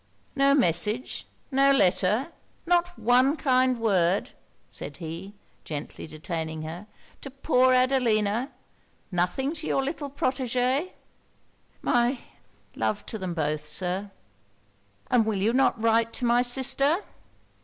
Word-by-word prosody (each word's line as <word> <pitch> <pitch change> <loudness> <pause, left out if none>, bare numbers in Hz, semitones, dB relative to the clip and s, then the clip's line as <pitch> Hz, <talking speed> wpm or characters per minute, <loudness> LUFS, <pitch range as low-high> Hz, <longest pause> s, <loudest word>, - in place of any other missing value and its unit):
'No 275 0 +4
message 210 - 0 0.2
no 275 +1 +5
letter 210 - +2 0.3
not 350 0 +1
one 255 +5 +3
kind 255 -3 +2
word,' 190 -4 +1 0.4
said - - -9
he, 170 +5 -7 0.3
gently 150 0 -7
detaining 160 0 -5
her, 170 +6 -7 0.3
'to 275 - -6
poor 260 -1 +2
Adelina? 245 -2 +2 0.6
Nothing 180 - 0
to 315 -1 -6
your 270 - +1
little 285 0 -4
protegé?' 255 +3 -1 0.9
'My 245 +1 +2 0.6
love 110 -1 -2
to 220 - -6
them 185 -3 -4
both, 150 -1 -2
Sir?' 185 +5 -2 1.0
'And 245 -3 +5
will 215 -2 -1
you 210 +4 +1
not 260 -2 +2
write 230 0 +2
to 245 - -2
my 240 +1 +4
sister?' 270 +7 +1
240 Hz, 120 wpm, -26 LUFS, 185-270 Hz, 1.0 s, no